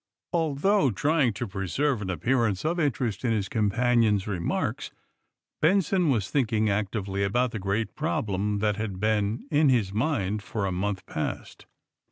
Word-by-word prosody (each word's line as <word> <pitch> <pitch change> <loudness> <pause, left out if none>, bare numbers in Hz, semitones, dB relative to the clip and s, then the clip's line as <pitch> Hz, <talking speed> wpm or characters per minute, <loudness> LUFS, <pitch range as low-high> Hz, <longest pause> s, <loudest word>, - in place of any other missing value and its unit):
Although 165 +1 +2
trying 145 - +2
to 115 +5 -4
preserve 105 +7 -1
an 95 - -4
appearance, 115 - 0
of 170 +2 0
interest 130 -8 -1
in 120 -3 +2
his 100 -3 -1
companion's 110 -1 +2
remarks, 95 -5 -2 0.7
Benson 185 0 +3
was 110 -8 0
thinking 110 -6 +1
actively 100 -1 -2
about 120 +5 +1
the 110 - -4
great 100 +4 -1
problem 105 - -1
that 105 -1 +1
had 105 -4 -4
been 110 +1 0
in 150 -1 +4
his 110 -7 +2
mind 110 -5 0
for 100 0 -3
a 95 - -1
month 95 +1 -2
past. - - -5
110 Hz, 150 wpm, -26 LUFS, 100-135 Hz, 0.7 s, in